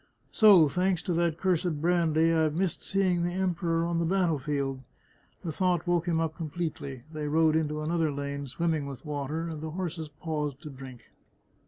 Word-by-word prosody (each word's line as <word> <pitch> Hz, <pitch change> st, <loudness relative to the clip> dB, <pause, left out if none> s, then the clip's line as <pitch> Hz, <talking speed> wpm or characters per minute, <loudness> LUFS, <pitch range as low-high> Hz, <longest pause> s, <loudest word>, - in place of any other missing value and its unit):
" -, -, -41 dB
So, 200 Hz, -8 st, +7 dB
thanks 180 Hz, +3 st, 0 dB
to 180 Hz, -, -1 dB
that 170 Hz, -1 st, +1 dB
cursed 175 Hz, -4 st, 0 dB
brandy, 165 Hz, -1 st, +3 dB
I've 160 Hz, -2 st, +2 dB
missed 185 Hz, 0 st, -1 dB
seeing 185 Hz, -3 st, +1 dB
the 175 Hz, +1 st, -1 dB
Emperor 175 Hz, -3 st, 0 dB
on 170 Hz, 0 st, 0 dB
the -, -, +1 dB
battle 175 Hz, -4 st, +1 dB
field." 135 Hz, -2 st, -2 dB, 0.6 s
The 170 Hz, -, -3 dB
thought 180 Hz, 0 st, +1 dB
woke 175 Hz, -1 st, +1 dB
him 165 Hz, -2 st, +1 dB
up 160 Hz, -1 st, -1 dB
completely. 155 Hz, -5 st, -5 dB
They 150 Hz, -1 st, -3 dB
rode 160 Hz, +1 st, +3 dB
into 155 Hz, -1 st, 0 dB
another 160 Hz, -1 st, +1 dB
lane 140 Hz, 0 st, -4 dB
swimming 155 Hz, +1 st, -1 dB
with 140 Hz, +2 st, -8 dB
water, 150 Hz, +2 st, -3 dB
and 160 Hz, -2 st, -6 dB
the 160 Hz, -, -4 dB
horses 165 Hz, -2 st, -4 dB
paused 150 Hz, -2 st, -4 dB
to 150 Hz, -, -7 dB
drink. 130 Hz, -3 st, -11 dB
160 Hz, 185 wpm, -28 LUFS, 150-175 Hz, 0.6 s, So